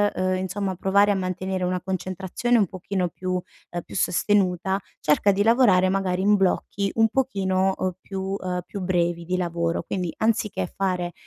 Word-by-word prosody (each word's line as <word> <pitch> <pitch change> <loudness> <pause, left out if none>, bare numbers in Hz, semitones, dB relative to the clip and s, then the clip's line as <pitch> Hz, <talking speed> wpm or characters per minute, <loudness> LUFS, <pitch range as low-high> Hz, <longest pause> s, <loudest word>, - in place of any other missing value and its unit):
uhm, 185 0 0
insomma, 190 +1 -2
provare 200 +3 +3
a - - +2
mantenere 185 0 -2
una 180 0 0
concentrazione 190 +5 -1
un 210 - +4
pochino 185 0 -3
più 185 +2 -4
uhm, 175 -1 -6
più - - -11
sostenuta, 190 0 +1 0.2
cerca 155 +7 +3
di 200 +1 +1
lavorare 220 -6 +5
magari 190 -1 0
in 210 +1 +5
blocchi 195 +1 0
un 225 -1 +4
pochino, 190 -7 +1
uhm, 185 - -1
più 195 -1 -5 0.2
uhm, 180 -1 -3
più 200 - -7
brevi 175 -2 0
di 185 +2 -1
lavoro, 170 -1 -1
quindi 180 -4 -3
anziché 220 - 0
fare 180 -3 -1
185 Hz, 165 wpm, -24 LUFS, 180-200 Hz, 0.2 s, lavorare